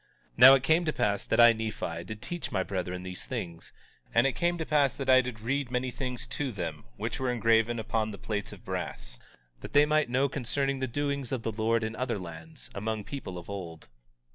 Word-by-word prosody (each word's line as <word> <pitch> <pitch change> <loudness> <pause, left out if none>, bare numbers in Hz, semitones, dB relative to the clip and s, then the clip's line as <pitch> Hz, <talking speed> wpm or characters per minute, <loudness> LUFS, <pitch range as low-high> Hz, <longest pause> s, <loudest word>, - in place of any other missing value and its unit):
19:22 - - -30
Now 130 +2 +11
it 135 - 0
came 160 +5 +3
to 155 - +1
pass 100 -1 0
that - - +1
I, 120 0 +9
Nephi, 110 -7 -4
did 110 +2 -8
teach 175 -1 -4
my 95 -2 +1
brethren 90 -1 -4
these 90 -1 -6
things; 85 -1 -6 0.4
and 115 +2 +5
it 135 - +3
came 175 0 0
to 160 - -3
pass 145 -4 +2
that 135 -1 +1
I 130 0 +8
did 125 -4 -6
read 135 +3 -1
many 125 0 -1
things 125 -1 -4
to 140 -3 -3
them, 85 - -5
which - - -3
were 130 -1 0
engraven 115 0 +3
upon 110 0 -1
the 100 - -7
plates 105 -1 -4
of - - -12
brass, - - -5 0.4
that - - -9
they 145 +1 +7
might 150 -3 +2
know 130 +3 +2
concerning 135 +1 -1
the 130 - -1
doings 140 0 -2
of 130 -4 -2
the 115 - -1
Lord 110 +1 +1
in 110 0 -3
other 125 -2 -1
lands, 80 -8 -9
among 110 +1 -3
people 100 -8 -6
of 85 - -9
old. 85 -8 -7
115 Hz, 220 wpm, -29 LUFS, 100-135 Hz, 0.4 s, Now